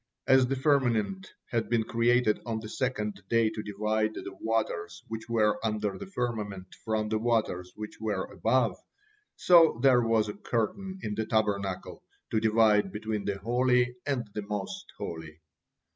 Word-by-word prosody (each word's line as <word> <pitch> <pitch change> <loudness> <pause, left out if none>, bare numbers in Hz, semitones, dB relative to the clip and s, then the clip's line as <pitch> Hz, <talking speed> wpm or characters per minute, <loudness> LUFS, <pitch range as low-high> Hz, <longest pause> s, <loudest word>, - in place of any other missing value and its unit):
As 130 -1 +5
the 135 - 0
firmament 135 - +1 0.2
had 115 -2 -1
been 115 -2 +2
created 115 -1 +2
on 115 -2 -3
the 110 -1 -8
second 105 -6 -2
day 115 -2 +3
to 110 - -5
divide 110 +1 -1
the 95 - -7
waters 85 -7 -2
which 110 +1 -6
were 105 -2 +2
under 105 -2 -1
the 200 - -8
firmament 105 - -4
from 110 -1 -1
the 110 0 0
waters 110 -6 0
which 105 0 -8
were 105 -4 -1
above, 115 0 +1 0.6
so 165 -9 +6
there 130 -3 +6
was 115 -2 +2
a 105 - -4
curtain 190 - -2
in 105 - -2
the 110 +1 -2
Tabernacle 100 -4 -1 0.3
to 110 - +2
divide 110 -2 +3
between 105 -1 -3
the 100 -1 -1
holy 125 +3 +2
and 125 -5 -1
the 105 - -3
most 100 -1 -5
holy. 80 -2 -7
110 Hz, 160 wpm, -29 LUFS, 105-120 Hz, 0.6 s, so